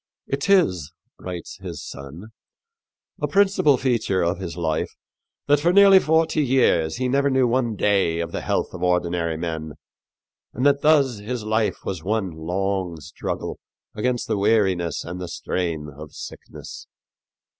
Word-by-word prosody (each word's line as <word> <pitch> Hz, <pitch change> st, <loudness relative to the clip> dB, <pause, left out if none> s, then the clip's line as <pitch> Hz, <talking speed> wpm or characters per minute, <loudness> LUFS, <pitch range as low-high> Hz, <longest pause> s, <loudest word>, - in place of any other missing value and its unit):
"It 140 Hz, +6 st, -3 dB
is," 95 Hz, -, +3 dB, 0.3 s
writes 90 Hz, -1 st, -7 dB
his 90 Hz, -6 st, -7 dB
son, 75 Hz, +10 st, -9 dB, 0.9 s
"a -, -, +1 dB
principal 195 Hz, -8 st, +3 dB
feature 115 Hz, -8 st, +1 dB
of 85 Hz, +3 st, 0 dB
his 90 Hz, -3 st, -6 dB
life 80 Hz, -2 st, -1 dB, 0.6 s
that 145 Hz, 0 st, +4 dB
for 170 Hz, +4 st, +3 dB
nearly 195 Hz, 0 st, +8 dB
forty 160 Hz, -1 st, +2 dB
years 120 Hz, -, +2 dB
he 130 Hz, +1 st, -1 dB
never 140 Hz, +2 st, +2 dB
knew 130 Hz, -1 st, +3 dB
one 120 Hz, -2 st, 0 dB
day 95 Hz, -5 st, +2 dB
of 85 Hz, 0 st, -3 dB
the -, -, -3 dB
health -, -, -1 dB
of 90 Hz, -, -8 dB
ordinary 85 Hz, -2 st, 0 dB
men, 80 Hz, -2 st, -4 dB, 0.8 s
and 125 Hz, -, -1 dB
that 140 Hz, 0 st, +4 dB
thus 140 Hz, -7 st, +3 dB
his 115 Hz, +2 st, -4 dB
life 110 Hz, 0 st, -1 dB
was 90 Hz, -5 st, -4 dB
one 100 Hz, -1 st, -1 dB
long 90 Hz, +2 st, -2 dB
struggle 75 Hz, -, -5 dB, 0.3 s
against 120 Hz, +3 st, -1 dB
the 110 Hz, -3 st, 0 dB
weariness 95 Hz, -5 st, +1 dB
and 90 Hz, +2 st, -6 dB
the 90 Hz, -, -4 dB
strain 85 Hz, -3 st, -3 dB
of 75 Hz, +1 st, -10 dB
sickness." -, -, -10 dB
100 Hz, 150 wpm, -23 LUFS, 85-130 Hz, 0.9 s, nearly